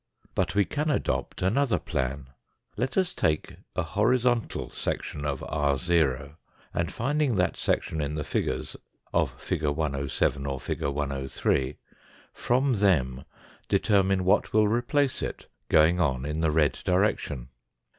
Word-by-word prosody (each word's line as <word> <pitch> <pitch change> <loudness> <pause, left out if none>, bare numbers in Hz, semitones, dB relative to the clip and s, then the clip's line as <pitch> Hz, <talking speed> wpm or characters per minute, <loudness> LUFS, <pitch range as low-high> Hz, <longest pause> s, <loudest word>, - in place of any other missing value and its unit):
But 95 - 0
we 100 -1 +4
can 150 +2 -1
adopt 140 - -1
another 120 +7 +2
plan. 65 -3 -3 0.4
Let 130 - -2
us 185 -2 +2
take 75 -1 -1 0.2
a 90 - +1
hori 105 +10 +2
zontal 120 -2 -1
section 75 0 -3
of 70 -2 -2
ro, 70 -1 +1 0.4
and 85 0 -1
finding 140 +1 0
that 90 -2 +1
section 80 - -1
in 75 +1 -2
the 75 - -2
figures, - - -2 0.4
of - - 0
fig. 80 - -3
107 70 -2 0
or 70 -1 -2
fig. - - -4
103, 70 -1 -1 0.6
from 130 +2 +1
them 75 - +2 0.4
determine 95 -2 +3
what 95 - +3
will 110 0 +5
replace 125 +5 +1
it, - - -4 0.2
going 80 +3 +5
on 65 -6 +1
in 75 +1 -2
the 80 -1 +2
red 75 -2 +2
direction. 90 - 0
80 Hz, 135 wpm, -27 LUFS, 70-105 Hz, 0.6 s, will